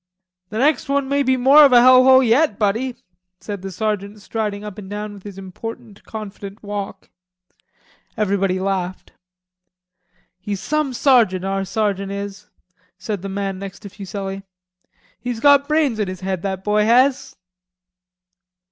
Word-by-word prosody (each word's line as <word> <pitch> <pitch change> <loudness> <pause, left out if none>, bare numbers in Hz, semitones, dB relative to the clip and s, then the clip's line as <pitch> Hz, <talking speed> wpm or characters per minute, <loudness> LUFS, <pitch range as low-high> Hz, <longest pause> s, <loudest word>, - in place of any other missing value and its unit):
"The 215 - -5
next 290 +3 +1
one 280 -1 +1
may 280 +1 +1
be 260 -1 +2
more 275 +4 +7
of 280 - +6
a 245 - +8
hell 255 +1 +7
hole 260 0 +7
yet, 240 -1 +3
buddy," 225 +5 0 0.4
said 205 -3 -6
the 195 - -6
sergeant 205 +1 -3
striding 210 -1 -4
up 210 0 -8
and 190 -2 -10
down 210 0 -5
with 200 - -12
his 200 -1 -10
important 210 +3 -9
confident 205 -1 -8
walk. 200 -2 -6 1.1
Everybody 195 -2 0
laughed. 185 -1 -3 1.3
"He's 200 +1 -4
some 300 +6 -1
sergeant, 230 -8 +3
our 195 0 -1
sergeant 200 -2 -1
is," 200 +1 -7 0.5
said 195 0 -4
the 195 - -5
man 195 -1 -3
next 195 0 -8
to 200 - -9
Fuselli. 195 0 -6 0.8
"He's 245 -2 -4
got 285 +2 +5
brains 300 -7 +1
in 210 - 0
his 185 -1 -7
head, 190 -2 -3
that 190 -1 -4
boy 210 +1 +2
has." 255 +4 +3
210 Hz, 150 wpm, -20 LUFS, 195-245 Hz, 1.3 s, a